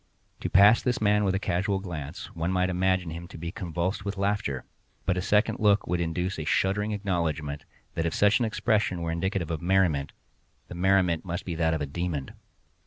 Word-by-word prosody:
To - - -3
pass 100 +4 +7
this 125 -1 0
man 105 0 +3
with 95 -1 +1
a - - 0
casual 100 0 0
glance, 80 -7 -6
one 85 +2 -1
might 90 0 +1
imagine 95 -1 +1
him 85 +1 -7
to - - -11
be 85 +1 -5
convulsed 90 0 -3
with 100 0 -4
laughter, 100 -9 -1 0.4
but 90 - +2
a 90 - -1
second 105 +4 +2
look 105 -1 +3
would 90 0 -1
induce 90 +2 -2
a - - -2
shuddering 100 +7 +1
acknowledgment, 85 -7 -2 0.3
that 85 0 -1
if 80 - -2
such 105 +1 +4
an 120 - +1
expression 105 -5 0
were 85 - -1
indicative 85 0 -2
of 80 - -3
merriment, 85 -6 +2 0.6
the - - -7
merriment 90 -2 +2
must 90 +1 -4
be 90 - -3
that 80 0 +1
of 80 - -3
a - - 0
demon. 75 -1 -3
90 Hz, 200 wpm, -27 LUFS, 85-100 Hz, 0.6 s, pass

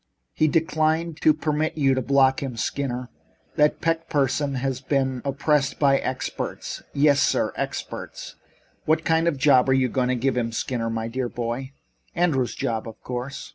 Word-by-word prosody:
He 155 - +2
declined 160 0 0
to 155 - +6
permit 155 +1 -1
you 135 -3 +3
to 130 - 0
block 135 +1 +3
him. 130 -4 -4
Skinner, 125 +1 -3 0.5
that 150 0 +2
Peck 165 0 -1
person 140 -1 0
has 130 0 -2
been 130 -2 0
opposed 140 0 +1
by 140 -2 +4
experts. 130 - -4
Yes, 145 0 +3
sir - - +1
experts! - - -5 0.5
What 160 +1 +2
kind 160 +1 +2
of 170 - +2
a - - -10
job 135 -2 +4
are - - +5
you 130 -1 +2
going 125 +1 0
to 130 - +2
give 130 +2 0
him, 115 -2 -1
Skinner, 115 -1 -2
my 115 0 -2
dear 125 +1 -3
boy?" 120 +4 -4 0.4
"Andrews' 145 -8 +1
job, 115 -1 -2
of 110 - -10
course." 125 +3 -5
135 Hz, 175 wpm, -24 LUFS, 125-150 Hz, 0.5 s, to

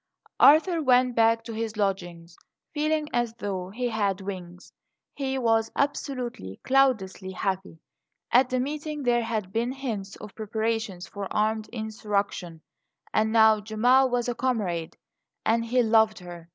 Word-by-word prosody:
ARTHUR 325 +3 +6
went 250 -3 +3
back 230 0 +3
to 230 - -7
his 220 -1 -4
lodgings 175 -4 -3 0.4
feeling 305 0 0
as 240 -2 0
though 190 -5 -4
he 245 +5 -2
had 205 -4 0
wings. 185 -2 -8 0.4
He 270 -1 -2
was 225 -3 +1
absolutely, 250 - -3
cloudlessly 215 -9 +1
happy. 190 -2 -3 0.5
At 250 +1 +5
the 255 -1 0
meeting 295 +2 -4
there 240 -1 +2
had 215 -4 -3
been 235 +2 0
hints 220 -7 -5
of 210 - -11
preparations 220 -3 -3
for 200 -1 -7
armed 215 +1 0
insurrection; 205 -6 -3 0.5
and 220 0 +2
now 220 -1 +5
Gemma 245 +5 +3
was 245 -1 -1
a 245 - 0
comrade, 205 -11 -2 0.5
and 230 +1 +2
he 245 +2 +2
loved 220 -1 +3
her. 175 -2 -10
220 Hz, 140 wpm, -26 LUFS, 195-250 Hz, 0.5 s, ARTHUR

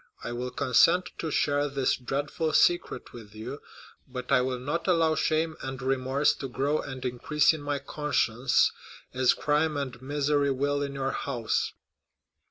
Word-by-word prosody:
I - - -4
will 125 +1 -3
consent 165 +8 +3
to 160 - -2
share 145 0 +1
this 135 -1 +1
dreadful 145 +5 -2
secret 175 0 +2
with 110 -3 -12
you, 125 +7 -7 0.5
but 125 0 -6
I 130 -2 +5
will 130 0 -1
not 150 +8 -3
allow 165 -3 +3
shame 155 0 0
and 130 0 -5
remorse 135 +2 +1
to 135 - -5
grow 140 +4 0
and 130 -2 -7
increase 140 +5 +2
in 155 - -6
my 145 0 -1
conscience, 135 -4 +1 0.4
as 130 -1 +3
crime 150 +1 +1
and 130 -3 -4
misery 145 +1 +1
will 140 +2 0
in 140 -1 -3
your 135 0 -1
house." 120 -5 -2
140 Hz, 160 wpm, -28 LUFS, 130-150 Hz, 0.5 s, I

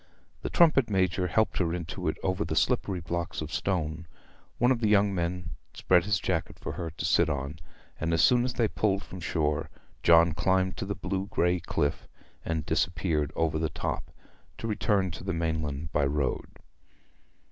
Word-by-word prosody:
The - - -3
trumpet 155 -9 +4
major 95 -2 +1
helped 110 +5 +1
her 85 -2 +1
into 85 -2 -5
it - - 0
over 95 0 0
the - - -3
slippery 95 -3 +1
blocks 85 +1 -3
of - - -5
stone, 85 -3 -2 0.5
one 125 +2 +3
of 125 - +2
the 110 -3 +1
young 100 -1 +4
men 85 -1 -2 0.2
spread 90 -1 +3
his 100 -2 +1
jacket - - -2
for - - -5
her 85 -2 -4
to 80 - -5
sit - - +3
on, 70 +2 -3 0.4
and 80 - -1
as 80 -1 +3
soon 125 -1 +5
as 125 0 -2
they 115 -3 +2
pulled 100 -2 0
from 95 - -9
shore 75 -3 -1 0.3
John 85 -1 +6
climbed 95 +2 +1
up 95 - -3
the 100 - -2
blue 95 +2 -3
grey 90 -3 +1
cliff, 70 -3 -2 0.4
and 80 -2 -2
disappeared 85 -4 0
over 80 -1 0
the 80 -1 0
top, - - -4 0.5
to - - -6
return 100 -3 +1
to 85 - -8
the 95 0 -2
mainland 80 -2 -2
by 70 - +2
road. 70 -1 -1
90 Hz, 180 wpm, -28 LUFS, 80-100 Hz, 0.5 s, John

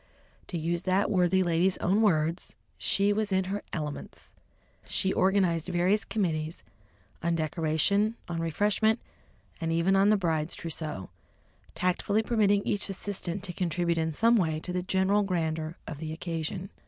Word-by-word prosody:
To 175 - -4
use 170 +1 -1
that 190 +3 +1
worthy 185 -1 +3
lady's 175 +2 +2
own 195 +5 +2
words, 165 -4 +1 0.2
"she 200 +1 +2
was 210 -1 -1
in 190 0 +2
her 195 +2 -3
elements!" 150 -3 -6 0.5
She 190 0 0
organised 185 -4 +2
various 185 +4 +2
committees 160 -6 -2 0.6
on 170 0 +1
decoration, 165 +7 +1
on 170 -2 -3
refreshment, 210 +7 +2 0.6
and 165 0 -1
even 170 +4 +2
on 195 +1 +5
the 215 - +5
bride's 165 -4 -1
trousseau, 155 - -5 0.6
tactfully 200 +4 +1
permitting 205 -4 +2
each 205 0 0
assistant 195 -1 -4
to 180 -3 -3
contribute 170 -1 0
in 160 0 0
some 230 +9 +4
way 160 -5 +1
to 180 - -5
the 180 - 0
general 190 +3 +2
grandeur 165 -4 -2
of 145 - -7
the 155 0 -5
occasion. 170 +3 -4
180 Hz, 150 wpm, -28 LUFS, 165-200 Hz, 0.6 s, on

